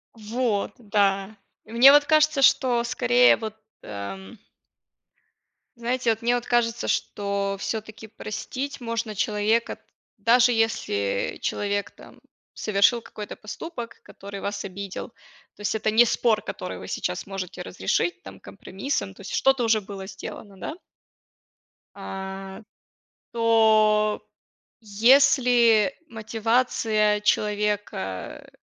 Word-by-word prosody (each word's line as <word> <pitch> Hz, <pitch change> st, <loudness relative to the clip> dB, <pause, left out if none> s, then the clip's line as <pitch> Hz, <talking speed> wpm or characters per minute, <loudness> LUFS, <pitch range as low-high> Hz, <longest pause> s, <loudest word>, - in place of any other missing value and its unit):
Вот, 220 Hz, -1 st, -2 dB
да. 200 Hz, -2 st, 0 dB, 0.3 s
И 220 Hz, -, -15 dB
мне 245 Hz, +4 st, +8 dB
вот 290 Hz, 0 st, +6 dB
кажется, 310 Hz, -1 st, +3 dB
что 245 Hz, -3 st, +4 dB
скорее 245 Hz, +1 st, +4 dB
вот 220 Hz, -1 st, -6 dB, 0.3 s
эм 150 Hz, -, -8 dB, 1.4 s
знаете, 240 Hz, +1 st, -1 dB
вот 225 Hz, 0 st, 0 dB
мне 240 Hz, +1 st, +2 dB
вот 245 Hz, -1 st, -2 dB
кажется, 240 Hz, -1 st, 0 dB
что 200 Hz, -1 st, -1 dB
всё-таки 220 Hz, +1 st, -5 dB
простить 265 Hz, +6 st, -6 dB
можно 230 Hz, -2 st, -3 dB
человека, 210 Hz, +3 st, 0 dB, 0.4 s
даже 245 Hz, +1 st, +4 dB
если 105 Hz, -, -1 dB
человек 205 Hz, 0 st, -2 dB
там -, -, -16 dB, 0.4 s
совершил 215 Hz, +3 st, +2 dB
какой-то 210 Hz, -2 st, -9 dB
поступок, 235 Hz, +2 st, -8 dB
который 200 Hz, 0 st, -10 dB
вас 200 Hz, 0 st, -4 dB
обидел. 195 Hz, 0 st, -7 dB, 0.5 s
То -, -, -15 dB
есть, 205 Hz, -, -1 dB
это 215 Hz, 0 st, 0 dB
не 230 Hz, +3 st, +6 dB
спор, 225 Hz, -1 st, +1 dB
который -, -, -6 dB
вы -, -, -9 dB
сейчас -, -, -3 dB
можете 185 Hz, -2 st, -6 dB
разрешить, 175 Hz, -5 st, -2 dB
там 95 Hz, 0 st, -11 dB
компромиссом, 195 Hz, -, -5 dB
то 195 Hz, -, -15 dB
есть, 195 Hz, -, -8 dB
что-то 270 Hz, -2 st, +3 dB
уже 225 Hz, -1 st, +3 dB
было 195 Hz, -1 st, -8 dB
сделано, 195 Hz, 0 st, -9 dB
да. 310 Hz, -, -6 dB, 1.2 s
А, 195 Hz, 0 st, -7 dB, 0.7 s
то, 215 Hz, -2 st, +3 dB, 0.6 s
если 235 Hz, +1 st, +4 dB
мотивация 220 Hz, -2 st, 0 dB
человека 210 Hz, -, -2 dB
215 Hz, 115 wpm, -24 LUFS, 200-235 Hz, 1.4 s, мне